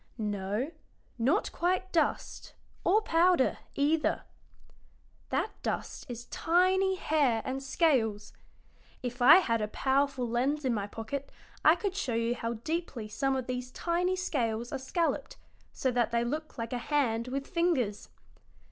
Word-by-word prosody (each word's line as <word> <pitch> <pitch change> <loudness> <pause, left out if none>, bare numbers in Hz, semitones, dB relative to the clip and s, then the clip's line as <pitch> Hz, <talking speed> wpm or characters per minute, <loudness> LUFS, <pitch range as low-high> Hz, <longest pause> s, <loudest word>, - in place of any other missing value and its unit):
"No, 210 +5 -2 0.5
not 280 - +2
quite 370 +2 0
dust, 330 - -1 0.3
or 425 +4 +3
powder, 340 -5 +3 0.2
either. 305 +3 +1 1.1
That - - 0
dust - - -4
is 240 0 -6
tiny 375 +3 +2
hair 285 -10 +1
and 265 +1 -3
scales. 255 - +1 0.7
If 245 0 -4
I 275 +6 +10
had 230 - +3
a 210 - 0
powerful 265 +1 +1
lens 265 +5 0
in 255 - +2
my 205 -2 -2
pocket 225 +7 -5 0.3
I 315 - +7
could 380 +1 -3
show 265 - -1
you 230 +1 +1
how 230 -1 -3
deeply 240 -2 -4
some 270 +4 0
of 260 -2 -2
these 250 0 -4
tiny 355 +6 0
scales 240 -10 -1
are - - -3
scalloped, 330 +6 -1 0.3
so 260 - -1
that 240 -2 +1
they 235 0 +1
look 305 +6 -4
like 230 +1 -4
a 245 - -1
hand 240 -4 0
with 275 +2 -3
fingers. 305 - 0
265 Hz, 145 wpm, -30 LUFS, 235-330 Hz, 1.1 s, I